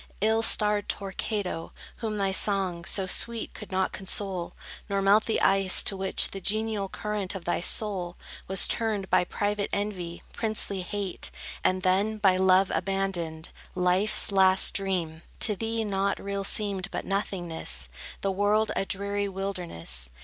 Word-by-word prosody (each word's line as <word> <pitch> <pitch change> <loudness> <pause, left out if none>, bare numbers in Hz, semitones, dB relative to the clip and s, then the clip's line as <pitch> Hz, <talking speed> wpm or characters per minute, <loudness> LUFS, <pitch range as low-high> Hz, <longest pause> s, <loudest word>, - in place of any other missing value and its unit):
Ill 220 +2 +3
starred 210 -2 +2
Torquato, 195 -3 -3 0.2
whom 220 -2 -3
thy 195 -1 +1
song, 190 -3 +1
So 195 0 0
sweet, 230 +4 -1
could 210 - -10
not 190 0 +1
console, 190 -2 -3 0.3
Nor 200 0 +1
melt 200 +2 +4
the 225 - +1
ice, 195 -1 +6
to 195 - +2
which 190 0 +3
The 195 - -6
genial 215 0 0
current 210 -2 -3
of 185 - -7
thy 175 - 0
soul 185 -3 -1 0.3
Was 190 -1 +1
turned, 215 -4 -1
by - - +5
private 205 +2 -1
envy, 185 -4 -3
princely 215 -3 0
hate; 195 0 -4 0.3
And 185 0 +1
then, 200 +4 +2
by 195 -3 +4
Love 190 0 +4
abandoned, 180 -5 -2 0.3
life's 185 +4 +3
last 190 -1 +4
dream! 175 -5 -1 0.2
To 210 - +2
thee, 225 +2 -2
nought 200 -1 0
real 200 0 -3
seemed 195 -2 0
but - - -4
nothingness, 175 - -2 0.3
The 195 - 0
world 205 +3 +2
a - - 0
dreary 200 +1 -1
wilderness. 175 - -3
195 Hz, 150 wpm, -27 LUFS, 185-205 Hz, 0.3 s, ice